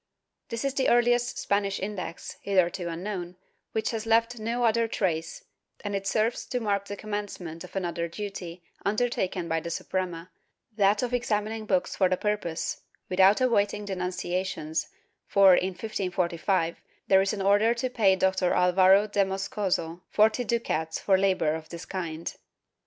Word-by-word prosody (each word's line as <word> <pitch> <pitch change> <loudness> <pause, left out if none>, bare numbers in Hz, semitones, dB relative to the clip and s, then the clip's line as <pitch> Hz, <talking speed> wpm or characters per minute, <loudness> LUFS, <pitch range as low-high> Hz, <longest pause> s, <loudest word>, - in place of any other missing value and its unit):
^ - - -51
This 230 +3 -3
is 275 - 0
the 270 -1 +1
earHest 240 0 +3
Spanish 200 -1 0
Index, 190 -4 -5
hitherto 185 -2 +1
imknown, 175 +1 -5 0.4
which 220 - -1
has 225 -1 -4
left 230 +1 +2
no 235 +3 -1
other 230 0 +3
trace, 170 -7 -2 0.4
and 205 -1 -2
it 195 0 -3
serves 215 +4 0
to 250 - -1
mark 200 -3 0
the 205 0 -6
commencement 200 -6 -5
of - - -12
another 170 -2 -2
duty 180 -2 -7 0.2
undertaken 200 -4 0
by 165 0 0
the 170 +1 -6
Suprema, 180 0 -3 0.4
that 205 +2 +3
of 250 0 -2
examining 220 -2 -1
books 180 -2 +1
for 185 -2 +3
the 185 - +1
purpose, 205 -6 -2 0.3
without 190 +4 +5
awaiting 210 -4 +1
denunciations, 180 -3 -2 0.4
for, 195 -2 +6
in 185 +1 +2
1545 180 -4 -1 0.3
there 190 0 +6
is 195 - +1
an 200 -2 -3
order 205 +4 +4
to 240 +2 -1
pay 210 -6 +3
Dr. 190 -1 +1
Alvaro 185 +2 +5
de 205 -1 +2
Moscoso 190 -3 -2
forty 220 +3 +3
ducats 160 -9 -1
for 195 - +3
labor 190 -5 +2
of 160 0 -6
this 170 0 -8
kind. 170 -3 -5
195 Hz, 155 wpm, -27 LUFS, 180-215 Hz, 0.4 s, for